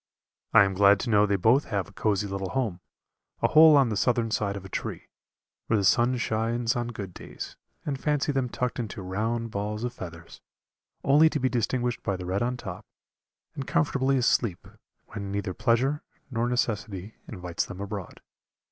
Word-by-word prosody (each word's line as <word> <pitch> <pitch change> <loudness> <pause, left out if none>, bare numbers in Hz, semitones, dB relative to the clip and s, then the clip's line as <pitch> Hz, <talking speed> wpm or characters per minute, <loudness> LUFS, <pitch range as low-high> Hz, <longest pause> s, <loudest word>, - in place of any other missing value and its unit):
I - - +8
am 95 -1 0
glad 100 +1 +5
to 120 - -2
know 105 0 +5
they 100 - +2
both 115 +9 +3
have 100 -4 -2
a 100 - -16
cozy 105 -2 0
little 95 -1 -4
home, 110 -8 -1 0.6
a - - +6
hole 155 -1 +8
on 135 -4 +4
the 110 - -1
southern 115 +1 +1
side 100 -2 0
of 95 - -9
a - - -6
tree, - - -5 0.6
where 110 - +2
the 100 - +1
sun 120 +7 +4
shines 115 +1 0
on 120 -1 -1
good 100 -6 -6
days, - - -8 0.3
and 140 -3 -3
fancy 150 -1 +1
them 135 -3 0
tucked 125 +1 -2
into 110 -3 -5
round 110 +5 -2
balls 105 +2 -3
of 125 0 -2
feathers, 85 -2 -10 0.6
only 150 +3 +6
to 150 - -2
be 130 0 +1
distinguished 120 0 -1
by 100 - -1
the 90 - -7
red 95 +2 -1
on 125 +1 0
top, - - -7 0.7
and 135 - -6
comfortably 135 -5 +2
asleep, 115 -6 +1 0.4
when 100 -2 -6
neither 100 -2 -2
pleasure 130 +8 +1 0.3
nor 120 0 0
necessity 110 -4 -2
invites 90 -4 -3
them 100 -2 -8
abroad. 100 -2 -6
115 Hz, 185 wpm, -27 LUFS, 100-125 Hz, 0.7 s, I